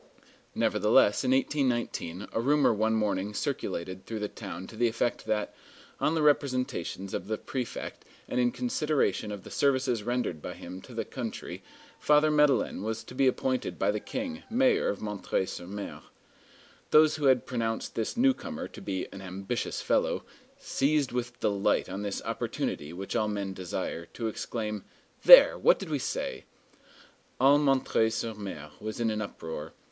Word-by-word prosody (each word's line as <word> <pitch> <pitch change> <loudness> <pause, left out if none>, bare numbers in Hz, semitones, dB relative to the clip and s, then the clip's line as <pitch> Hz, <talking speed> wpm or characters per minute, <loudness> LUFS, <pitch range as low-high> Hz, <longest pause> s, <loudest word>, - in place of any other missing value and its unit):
Nevertheless, - - +3
in - - 0
1819 125 - 0
a 115 - 0
rumor 145 0 +4
one 110 +1 +1
morning 105 -1 -1
circulated 95 - -3
through 115 - -4
the 105 -1 -2
town 90 -2 -7
to 110 - -11
the 120 +2 +2
effect 115 +1 -1
that, 105 -1 -1 0.5
on 160 - +2
the 160 - +1
representations 130 - 0
of 90 - -3
the 110 0 -1
prefect 125 -4 -5 0.2
and - - -1
in 120 -1 +4
consideration 155 - 0
of 100 -2 -6
the - - -11
services 130 -4 +2
rendered 120 -9 -2
by - - -6
him 90 +2 -8
to - - -12
the - - -2
country, - - -6 0.4
Father 150 +1 +4
Madeleine 150 -9 +3
was 110 +2 -3
to - - -11
be 135 +1 +3
appointed 130 -7 0
by 100 +1 +2
the 105 - -2
King, 260 - -5
mayor 255 +3 +3
of 100 - -3
M. 105 -2 -5 0.2
sur 85 - -7
M. 100 +3 -6 0.9
Those 155 0 +6
who 150 - -2
had 130 -2 +4
pronounced 115 -2 -2
this 110 - -2
newcomer 260 0 +1
to - - -11
be 95 -2 -3
"an 95 - -8
ambitious 95 +1 -3
fellow," - - +1 0.3
seized 145 0 +1
with 120 0 -3
delight 100 -1 +1
on 95 +2 -4
this 100 -1 -3
opportunity 75 +1 -3
which 95 +5 -5
all 110 -2 +2
men 100 -2 -3
desire, 85 -2 -4
to 115 - -3
exclaim, 105 -2 -4 0.4
"There! - - +10
what - - +5
did - - -7
we - - 0
say!" - - -3 0.9
All 140 +2 +6
M. 135 -1 +3 0.2
sur 115 0 -2
M. 95 -9 -7
was 110 +1 -5
in 115 -2 +1
an 110 0 -2
uproar. 80 -6 -6
115 Hz, 165 wpm, -29 LUFS, 100-140 Hz, 0.9 s, There